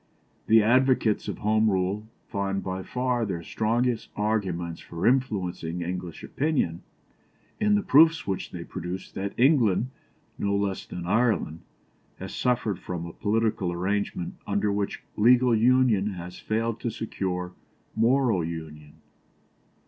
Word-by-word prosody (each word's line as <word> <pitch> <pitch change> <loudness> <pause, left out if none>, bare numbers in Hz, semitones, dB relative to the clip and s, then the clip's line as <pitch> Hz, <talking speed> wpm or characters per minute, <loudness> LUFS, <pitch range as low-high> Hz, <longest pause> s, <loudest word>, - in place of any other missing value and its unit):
The 110 0 +6
advocates 125 -1 +3
of - - -3
Home 110 +1 +2
Rule 95 +2 -1 0.2
find 100 -2 -2
by 95 0 -3
far 125 +3 -1
their 85 -6 -3
strongest 115 +5 0
arguments 95 -6 -1
for 85 0 -5
influencing 95 -9 0
English 90 -1 -5
opinion, 135 - -1 0.8
in 210 0 +3
the 205 - +1
proofs 160 +2 +5
which 95 -2 -3
they 85 -2 -7
produce 90 +1 -6
that 100 +1 -4
England, 125 - +3 0.5
no 100 0 0
less 100 -1 -2
than 90 -1 -6
Ireland, 105 -5 +1 0.6
has - - -7
suffered 120 -6 0
from 85 -2 -5
a 85 - -8
political 110 -3 0
arrangement 95 0 -2
under 105 - +1
which 100 0 -2
legal 125 +3 +5
union 115 -4 +3
has 90 0 -8
failed 115 +1 -1
to 120 - -2
secure 90 -5 -3 0.4
moral 115 -4 +3
union. 80 -2 -7
105 Hz, 130 wpm, -26 LUFS, 90-120 Hz, 0.8 s, The